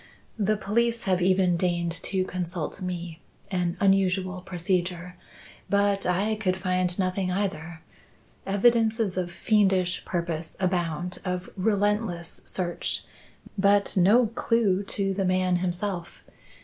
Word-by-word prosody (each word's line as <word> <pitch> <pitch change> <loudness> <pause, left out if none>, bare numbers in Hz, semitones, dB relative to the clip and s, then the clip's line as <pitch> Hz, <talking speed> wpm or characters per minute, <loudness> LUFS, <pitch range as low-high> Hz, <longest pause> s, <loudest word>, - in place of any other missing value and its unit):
The 210 +1 +2
police 235 +3 0
have 185 -4 +1
even 185 -1 +3
deigned 170 -1 0
to 190 -1 0
consult 175 -1 -4
me, 175 -2 -5 0.3
an 175 -2 -1
unusual 190 -1 +2
procedure 180 0 -2 0.5
but 200 -1 +2
I 195 +5 +1
could 185 -3 0
find 185 -1 0
nothing, 185 0 0
either. 170 -4 -3 0.7
Evidences 220 0 +2
of 180 -1 -2
fiendish 190 -1 +1
purpose 170 -2 -3
abound 180 -2 -1
of 180 -1 -4
relentless 200 -3 0
search 175 -2 -2 0.6
but 200 +1 +3
no 205 +7 +5
clue 225 -3 +1
to 195 0 0
the 195 0 -1
man 185 -1 +2
himself. 180 0 -3
185 Hz, 115 wpm, -26 LUFS, 175-200 Hz, 0.7 s, no